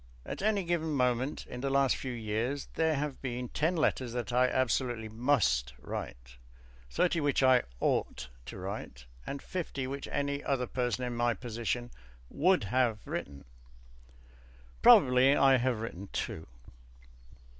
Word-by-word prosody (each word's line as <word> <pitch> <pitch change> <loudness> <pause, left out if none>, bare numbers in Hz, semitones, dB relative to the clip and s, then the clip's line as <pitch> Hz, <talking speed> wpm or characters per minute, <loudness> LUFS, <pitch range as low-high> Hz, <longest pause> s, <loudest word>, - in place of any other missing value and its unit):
At - - -5
any 205 -1 +1
given 165 -2 -1
moment 125 +1 0
in 125 - -7
the 135 - -1
last 135 -1 +3
few 130 - -5
years 115 +4 -3
there 160 -1 +1
have 145 -1 -3
been 125 -2 -4
ten 160 +4 0
letters 130 -6 0
that 120 -2 -3
I 125 +1 +4
absolutely 120 -3 0
must 105 - +1
write, - - -7 0.5
thirty 170 - +1
which 145 -2 +1
I 130 -1 +6 0.2
ought 65 - -1 0.2
to - - -7
write, - - -6 0.2
and 140 - -5
fifty 165 -7 -4
which 140 +1 -5
any 140 0 -2
other 130 -2 0
person 125 -1 -2
in 120 -1 -3
my 120 -1 +1
position 120 0 -3 0.4
would 180 - +3
have 115 0 0
written. 70 -1 -6 1.4
Probably 130 +2 +7
I 135 -2 +5
have 125 -3 0
written 100 -3 -6
two. 80 - -4
125 Hz, 145 wpm, -31 LUFS, 115-140 Hz, 1.4 s, Probably